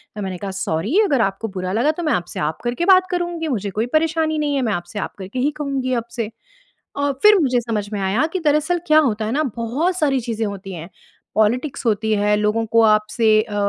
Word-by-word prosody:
तो 210 - -5
मैंने 190 -2 -4
कहा, 195 +2 -5
"सॉरी 175 - -1
अगर 280 - +2
आपको 195 +2 -1
बुरा 185 0 -3
लगा 240 +8 +2
तो - - -2
मैं 305 - +1
आपसे 175 0 -3
आप 150 +1 -2
करके 240 +8 -1
बात 370 0 +4
करूँगी, 345 -2 -2
मुझे 210 -8 -2
कोई 215 +4 -1
परेशानी 315 0 0
नहीं 295 -1 0
है। 275 - +1
मैं 220 -3 0
आपसे 175 +3 -5
आप - - -4
करके 195 +6 -5
ही 280 +4 +1
कहूँगी 270 -3 -1
अब - - -30
से।" 225 -3 -2 0.7
और 285 0 0
फिर 420 -1 +7
मुझे 255 -4 +2
समझ 220 -3 -3
में 205 - -2
आया 195 +10 +1
कि 370 - 0
दरअसल 305 +4 +2
क्या 310 0 +6
होता 215 0 -3
है 220 - -2
ना, 295 +4 +1
बहुत 270 +11 -1
सारी 275 -5 +2
चीज़ें 225 -2 -3
होती 195 -1 -6
हैं, 165 0 -8 0.5
पॉलिटिक्स 245 +6 0
होती 220 0 +1
है, 210 0 +2
लोगों 210 +2 0
को 230 +1 +3
आपसे 215 +1 +2
अ, 215 -2 -8
230 Hz, 230 wpm, -20 LUFS, 210-295 Hz, 0.7 s, फिर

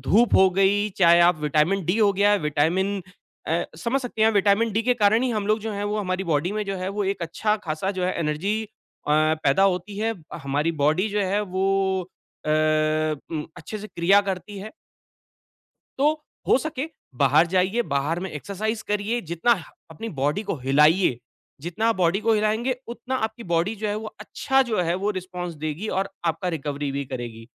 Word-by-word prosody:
धूप 235 +3 +3
हो 190 0 +7
गई, 195 +3 +2
चाहे 170 -1 +6
आप 170 -2 +4
विटामिन 155 +5 +1
डी 180 +6 +1
हो 205 -2 +4
गया, 205 +2 +3
विटामिन 185 +7 +1 0.5
अ 170 +2 +1
समझ 245 +7 0
सकती 240 -4 -3
हैं, 220 - +6
विटामिन 205 +2 +3
डी 225 - +1
के 250 +1 +2
कारण 220 +1 +3
ही 260 - +1
हम 210 -3 -2
लोग 215 +1 +2
जो 220 0 -4
हैं, 200 0 -3
वो 210 +1 -1
हमारी 185 -1 -2
बॉडी 160 +1 0
में 215 0 -2
जो 195 -1 -3
है, 185 +1 -3 0.2
एक 195 -3 -4
अच्छा 210 +6 0
खासा 160 +5 -2
जो 180 - 0
है 185 - 0
एनर्जी 170 +8 -1
अ, 210 -7 -12
पैदा 155 +2 +3
होती 195 +1 0
है। 225 +1 0 0.3
हमारी 145 +4 0
बॉडी 165 +8 +2
जो 205 0 -1
है 205 - +2
वो 190 +1 +1 0.8
अ - - 0 0.8
उम, 155 -2 -3
अच्छे 195 +6 -7
से 215 - -7
क्रिया 190 +3 +4
करती 195 +2 -6
है। 215 +3 -7 1.3
तो 295 +2 +4 0.4
हो - - +6
सके, 310 0 -4 0.3
बाहर 145 +5 +4
जाइए, 190 +6 +1
बाहर 150 +1 -1
में 190 -2 -4
एक्सरसाइज़ 215 +8 -4
करिए, 210 +3 0
जितना 170 +7 +1
ह - - -9 0.3
अपनी 225 +9 -6
बॉडी 150 +6 -1
को 205 - -3
हिलाइए, 145 +2 +3 0.4
जितना 220 +8 0
बॉडी 185 +1 +1
को 225 0 +2
हिलाएँगे, 220 +4 +1
उतना 245 +2 -5
आपकी 225 +2 -11
बॉडी 170 +5 0
जो 210 +1 -3
है, 205 - -1
वो 215 0 -7
अच्छा 265 +5 0
जो 225 -7 -1
है 170 +1 0
वो 200 +3 -1
रिस्पॉन्स 180 -3 -5
देगी 160 +8 -3
और 190 +1 -1 0.2
आपका 165 +3 -1
रिकवरी 145 -3 -3
भी 140 0 -2
करेगी। 120 -3 -7
190 Hz, 190 wpm, -24 LUFS, 165-215 Hz, 1.3 s, हो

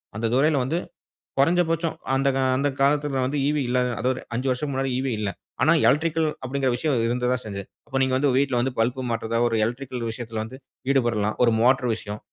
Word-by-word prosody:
அந்த 110 - -2
துறையில 145 +4 +3
வந்து, 145 +7 -1 0.6
குறைஞ்சபட்சம் 165 +2 +2 0.2
அந்த 135 +1 +2
கா 135 - +1
அந்த 145 +2 +1
காலத்துல 140 -1 +2
வந்து 145 +3 -2
ஈவீ 150 0 +1
இல்லாத 125 0 +1
அதுவொரு 125 +2 0
5 130 +3 -1
வருசம் 130 +3 -2
முன்னாடி 135 0 -1
ஈவீ 130 -1 -1
இல்ல. 105 -2 -1 0.3
ஆனா 155 - +5 0.2
எலக்ட்ரிக்கல் 160 +1 +2 0.2
அப்படிங்குற 130 0 0
விஷயம் 145 +1 0
இருக்க 125 +1 0
தான் 125 - -4
செஞ்சது. 100 -2 -5 0.2
அப்போ 135 - -2
நீங்க 130 -1 +1
வந்து 145 0 +2
வீட்ல 135 -2 +1
வந்து 130 - -1
பல்ப் 120 +3 +1
மாட்றதா 115 0 -1
ஒரு 115 -1 0
எலக்ட்ரிக்கல் 125 0 -4
விஷயத்துல 110 -1 -5
வந்து 125 +4 -9 0.3
ஈடுபடலாம். 115 -6 +1
ஒரு 115 - +4
மோட்டார் 125 0 +3
விஷயம், 105 -1 -7
130 Hz, 190 wpm, -24 LUFS, 120-140 Hz, 0.6 s, ஆனா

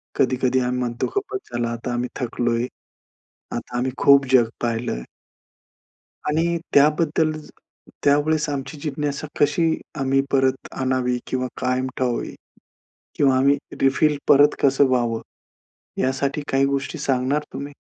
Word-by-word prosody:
कधी-कधी 130 0 +2
आम्ही 125 0 -1
म्हणतो 120 -1 -2
खूपच 400 -1 -3
झाला 120 -1 -1
आता 120 +1 -4
आम्ही 120 +1 -2
थकलोय. 120 0 0 0.9
आता 120 - -5
आम्ही 130 +2 0
खूप 140 0 +6
जग 120 -3 +5
पाहिलंय 115 - -2 1.2
आणि 165 +3 +1 0.2
त्याबद्दल 155 +2 +3 0.7
त्यावेळेस 150 +2 +2
आमची 140 +1 -4
जिज्ञासा 150 0 -3
कशी 145 +3 +3 0.3
आम्ही 135 0 +2
परत 135 -1 +1
आणावी 130 -1 0
किंवा 130 0 -1
कायम 130 0 0
ठेवावी 125 -2 -2 0.8
किंवा 135 -2 +4
आम्ही 140 +2 +4 0.2
रिफिल 145 +2 +3
परत 145 +1 +6
कसं 140 0 +5
व्हावं, 120 -3 0 0.8
यासाठी 140 +3 0
काही 135 0 +3
गोष्टी 140 +4 -2
सांगणार 140 +1 0
तुम्ही? 140 +1 -6
135 Hz, 120 wpm, -22 LUFS, 125-145 Hz, 1.2 s, खूप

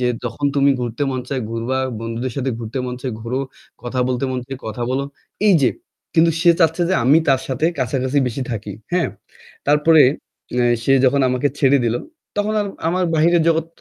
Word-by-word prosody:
যে 125 - +1 0.2
যখন 145 +4 -2
তুমি 140 0 +4
ঘুরতে 120 +3 -3
মন 130 -1 -2
চায় 130 -3 -2
ঘুরবা। 115 +3 -2 0.2
বন্ধুদের 115 +2 -4
সাথে 135 -1 -1
ঘুরতে 115 +3 -5
মন 125 - -4
চায়, 125 -2 -3
ঘুরো। 120 +3 -3 0.4
কথা 125 +1 -2
বলতে 130 +1 -1
মন 130 - -2
চায়, 135 -1 -6
কথা 110 +2 -4
বলো। 135 +1 0 0.4
এই 195 - +6
যে - - +4 0.4
কিন্তু 165 0 +5
সে 170 - +6
চাচ্ছে 165 +2 +3
যে - - +3
আমি 145 +5 +6
তার 135 -1 +4
সাথে 135 +5 0
কাছাকাছি 130 +2 0
বেশি 125 +2 -3
থাকি। 105 -3 -4 0.2
হ্যাঁ? 180 - +2 0.6
তারপরে 150 +1 +5 0.5
অ্যা 125 - +3 0.2
সে 135 - +3
যখন 140 +2 +3
আমাকে 125 +3 +1
ছেড়ে 140 0 +4
দিল, 115 - +1 0.4
তখন 205 +1 0
আর 205 - -1 0.2
আমার 180 +1 +1
বাহিরের 165 +1 +4
জগৎ 165 0 +1
130 Hz, 190 wpm, -20 LUFS, 125-155 Hz, 0.6 s, এই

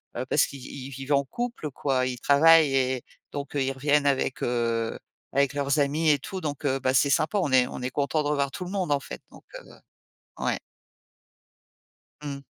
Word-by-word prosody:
bah 125 - -3
parce 140 - +3
qu'ils 135 -2 -10
ils 135 -1 -8
y - - -8
vivent 135 +2 -3
en 140 0 +3
couple, 235 - -4
quoi, 130 -2 0
ils 125 -1 -4
travaillent 155 +1 +6
et 130 -1 +1 0.3
donc 140 -1 -5
ils 135 -2 0
reviennent 145 +1 +2
avec, 135 -1 0
heu, 115 -2 -1 0.4
avec 140 0 +2
leurs 140 +1 0
amis 150 +3 +2
et 145 - +5
tout. 190 +7 -6
Donc, 150 -2 -4
heu, 135 -1 +1
bah 130 0 0
c'est 140 +2 +4
sympa, 160 +9 +2
on 145 - -1
est 125 -1 +5
on - - -7
est 125 - -2
content 145 +3 0
de 145 - -1
revoir 140 -2 +1
tout 180 - -6
le 180 - -7
monde, 185 -6 -1
en 140 - +1
fait, - - -8
donc, - - -16 0.2
heu - - -16 0.7
ouais. - - 0 1.6
Mmh. 140 -1 -6
140 Hz, 205 wpm, -26 LUFS, 130-150 Hz, 1.6 s, travaillent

